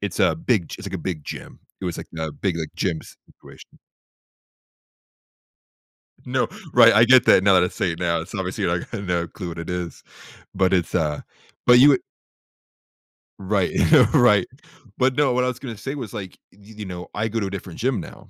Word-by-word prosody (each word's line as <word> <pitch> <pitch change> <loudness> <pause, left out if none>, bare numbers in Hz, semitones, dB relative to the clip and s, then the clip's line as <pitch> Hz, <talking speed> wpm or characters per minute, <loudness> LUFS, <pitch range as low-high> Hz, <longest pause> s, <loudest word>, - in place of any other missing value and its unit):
It's 100 - -4
a - - +3
big 125 - -1
g - - -7
it's, - - -6
like, - - -8
a - - -3
big 85 -5 -5
gym, - - -9 0.2
it - - -6
was, 85 -2 -3
like, - - -8
a 80 -1 -3
big, 90 0 -2
like, 80 -2 -6
gym 85 -4 -1 0.3
situation - - -17 2.5
No, - - 0 0.3
right, - - +8
I 110 +3 +6
get 130 0 +6
that, 95 - +5
now 100 -1 +5
that 90 - +5
I - - +1
say 90 - -2
it 85 - -7
now, 85 -2 0
it's 85 +4 -9
obviously, 95 -3 -3
like, 85 0 -2
no 90 -5 -2
clue 90 +1 -7
what 85 - -7
it 85 - -7
is, 90 -1 -5 0.5
but 95 0 +2
it's 90 -4 0
a 75 -4 -1 0.4
but 125 0 +8
you 140 - +8
w 135 - +5 1.4
Right 95 -1 0 0.4
Right. - - +4 0.5
But 130 0 +2
no, 145 -4 +3
what 125 0 +1
I - - +1
was 125 0 -4
gonna 125 -5 -7
say 135 +7 -5
was, 120 -8 -7
like, 95 -3 -7 0.2
y 100 - -24
y 105 +2 -16
you 105 - -6
know, 90 -2 -8
I 110 +2 -1
go 115 +1 -2
to 100 - -1
a - - -4
different 95 -3 -8
gym 125 -3 0
now, - - -11
95 Hz, 210 wpm, -22 LUFS, 85-115 Hz, 2.5 s, right